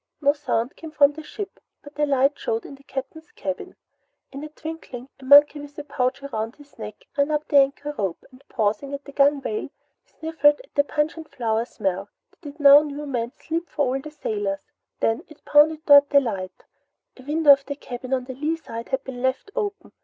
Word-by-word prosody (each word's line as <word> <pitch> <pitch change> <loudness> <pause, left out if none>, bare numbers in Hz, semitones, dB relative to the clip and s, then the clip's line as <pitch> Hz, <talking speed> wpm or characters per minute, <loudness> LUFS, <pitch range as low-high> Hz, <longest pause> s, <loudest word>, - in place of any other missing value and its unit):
No 285 -1 +4
sound 270 -4 -2
came 325 - -9
from 290 -1 +4
the 315 - -8
ship 400 +6 -8 0.2
but 290 +1 -14
a 295 - +3
light 275 0 +3
showed 225 0 -2
in - - -9
the 275 - -14
Captain's 275 +6 -7
cabin. 290 -11 -5 0.6
In 275 +2 -7
a 305 - -6
twinkling, 305 -5 -8
a 265 - -12
monkey 290 +2 +7
with 290 0 -11
a 295 - -5
pouch 275 -1 -1
about 230 -2 -4
its 285 -4 -18
neck 210 -1 -8
ran 280 +1 +2
up 300 0 -1
the 290 - +4
anchor 280 +2 +2
rope 195 -7 -3
and 255 +1 -18
pausing 225 +6 -1
on - - -6
the 280 - -10
gunwale, 285 +9 +1 0.3
sniffed 320 -2 -9
at 295 0 +7
the 285 - +3
pungent 305 +2 -2
flower 225 -1 -1
smell 190 -5 -3 0.2
that 290 -5 -11
it - - -27
now 285 0 +9
knew 295 0 -6
meant 245 -3 -3
sleep 335 +2 -4
for 290 -1 0
all 270 - -2
the 305 - -8
sailors. 205 -9 -3 0.4
Then 225 +1 +1
it 310 - -17
bounded 305 +1 +4
toward 285 -1 +8
the 285 - +6
light. 195 -8 -5 0.5
A - - -12
window 300 +1 +5
of 275 0 -1
the 285 - -3
cabin 255 -2 -8
on 260 -1 +1
the 260 +1 -7
lee 300 +5 -1
side 230 -7 -8
had 265 0 -1
been 250 -2 -7
left 260 +9 -1
open. 420 -3 -3
280 Hz, 210 wpm, -24 LUFS, 255-300 Hz, 0.6 s, now